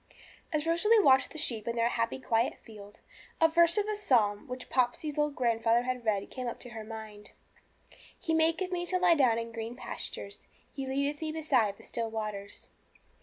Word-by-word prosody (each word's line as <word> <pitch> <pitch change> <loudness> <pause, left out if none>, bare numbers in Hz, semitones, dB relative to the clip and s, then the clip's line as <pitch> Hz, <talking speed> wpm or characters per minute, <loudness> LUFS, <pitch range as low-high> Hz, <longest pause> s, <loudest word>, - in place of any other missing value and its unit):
As 305 0 0
Rosalie 380 +7 +4
watched 265 -9 +5
the - - -10
sheep 230 -8 0
in 235 - -1
their 230 0 +2
happy, 230 0 -1
quiet 235 -2 0
field, 205 -2 -13 0.4
a 325 - +6
verse 340 +3 +4
of 415 - +2
the 425 0 -2
psalm 230 - +1
which 250 0 -6
Popsey's 260 +4 0
old 295 -1 0
grandfather 230 -1 +2
had 250 -1 -3
read 205 -3 -1
came 255 -2 -5
into 245 +1 -6
her 225 -2 -7
mind 215 -1 -9 0.9
'He 325 - -2
maketh 330 +3 +2
me 350 -1 -1
to 370 - +1
lie 360 -1 +5
down 255 -7 +3
in 230 0 -4
green 230 +1 -5
pastures; 200 -4 -6 0.3
He 270 -1 -5
leadeth 280 +3 -1
me 315 -1 -2
beside 260 -10 +1
the - - -16
still 230 -1 -3
waters.' 210 -2 -6
250 Hz, 185 wpm, -30 LUFS, 225-315 Hz, 0.9 s, a